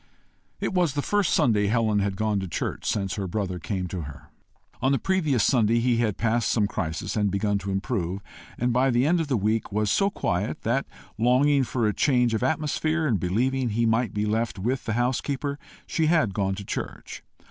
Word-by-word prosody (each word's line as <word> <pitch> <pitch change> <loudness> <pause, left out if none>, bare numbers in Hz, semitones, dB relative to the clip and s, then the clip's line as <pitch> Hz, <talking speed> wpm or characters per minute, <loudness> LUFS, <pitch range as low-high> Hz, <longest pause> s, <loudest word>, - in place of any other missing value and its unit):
It - - -2
was 175 -6 +1
the 145 - -1
first 205 -4 +1
Sunday 105 -4 +3
Helen 110 -1 +2
had 100 -1 -1
gone 105 0 0
to 95 - -4
church 85 - -4
since 95 -2 -1
her 100 -2 -2
brother 90 -1 -3
came 90 +2 -3
to 90 -1 -4
her. 70 -2 -10 0.5
On 130 - +2
the 135 - +3
previous 155 - +1
Sunday 115 -3 +3
he 120 0 +2
had 110 -4 0
passed 115 0 +1
some 110 -3 +2
crisis 90 -2 -3
and 105 -2 +2
begun 100 +1 0
to 100 0 -6
improve, 95 -2 -2 0.4
and 120 0 0
by 130 +2 +3
the 125 +1 +2
end 170 +3 +3
of 160 - -3
the 130 -4 +1
week 110 +1 0
was 105 0 0
so 195 - +3
quiet, 100 - -2
that 125 +5 0 0.3
longing 135 +4 +4
for 120 -2 -1
a 105 - +1
change 125 -3 +2
of 110 - 0
atmosphere, 155 +3 0
and 115 -10 +1
believing 125 +8 0
he 115 +2 +1
might 115 -1 +1
be 105 0 -1
left 110 +1 -1
with 120 +7 -2
the 110 - -1
housekeeper, 135 +4 -1 0.3
she 160 -2 0
had 155 - +2
gone 95 0 0
to 100 0 -8
church. - - -6
115 Hz, 205 wpm, -25 LUFS, 100-130 Hz, 0.5 s, longing